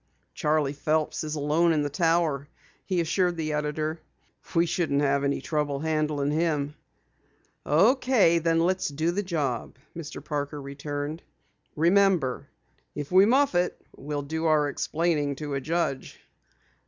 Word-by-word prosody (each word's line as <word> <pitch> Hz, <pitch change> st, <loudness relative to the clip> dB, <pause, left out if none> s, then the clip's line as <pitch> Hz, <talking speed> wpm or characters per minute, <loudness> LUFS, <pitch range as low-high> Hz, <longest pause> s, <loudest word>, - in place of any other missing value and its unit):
"Charley 150 Hz, -2 st, +1 dB
Phelps 155 Hz, +2 st, -1 dB
is 155 Hz, 0 st, -3 dB
alone 155 Hz, +3 st, +2 dB
in 150 Hz, -2 st, +1 dB
the 145 Hz, -, -1 dB
Tower," 165 Hz, -4 st, +1 dB, 0.4 s
he 185 Hz, -3 st, 0 dB
assured 175 Hz, +1 st, 0 dB
the 155 Hz, -1 st, -2 dB
editor. 155 Hz, +2 st, -2 dB, 0.5 s
"We 170 Hz, +1 st, +4 dB
shouldn't 160 Hz, -4 st, 0 dB
have 140 Hz, 0 st, +2 dB
any 140 Hz, 0 st, 0 dB
trouble 150 Hz, -3 st, -1 dB
handling 155 Hz, -2 st, 0 dB
him." 150 Hz, -2 st, 0 dB, 0.9 s
"Okay, 210 Hz, -, +4 dB
then 165 Hz, 0 st, +2 dB
let's 185 Hz, +2 st, +1 dB
do 155 Hz, +4 st, -1 dB
the 200 Hz, +4 st, -1 dB
job," 145 Hz, -, -3 dB, 0.2 s
Mr. 160 Hz, -2 st, -8 dB
Parker 145 Hz, -1 st, -3 dB
returned. 145 Hz, +3 st, -5 dB, 0.5 s
"Remember, 170 Hz, -6 st, +2 dB, 0.5 s
if 145 Hz, +1 st, -5 dB
we 190 Hz, +2 st, +6 dB
muff 275 Hz, +2 st, +3 dB
it, 175 Hz, 0 st, 0 dB, 0.2 s
we'll 145 Hz, 0 st, -4 dB
do 160 Hz, +3 st, -3 dB
our 150 Hz, -2 st, +3 dB
explaining 150 Hz, -2 st, -1 dB
to 145 Hz, 0 st, -5 dB
a 135 Hz, -, -1 dB
judge." 160 Hz, -2 st, -2 dB
155 Hz, 140 wpm, -26 LUFS, 145-170 Hz, 0.9 s, we